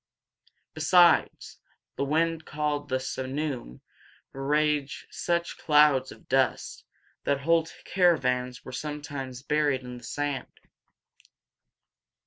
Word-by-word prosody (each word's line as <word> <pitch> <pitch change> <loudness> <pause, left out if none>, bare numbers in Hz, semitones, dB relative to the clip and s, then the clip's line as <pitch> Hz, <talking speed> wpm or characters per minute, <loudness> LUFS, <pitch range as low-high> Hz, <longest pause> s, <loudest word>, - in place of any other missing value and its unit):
Besides, 170 +3 +3 0.4
the - - -1
wind 160 +2 0
called 150 -1 -2
the 130 0 0
simoom 130 - -4 0.5
raised 150 +1 0
such 170 0 -2
clouds 150 -4 +4
of - - -15
dust 130 -1 0 0.4
that 140 -1 0
whole 165 +2 +2 0.2
caravans 125 -9 +1
were - - -8
sometimes 140 -3 -6
buried 145 -3 +1
in 125 0 -8
the - - -19
sand. 145 -2 -4
145 Hz, 100 wpm, -27 LUFS, 130-155 Hz, 0.5 s, clouds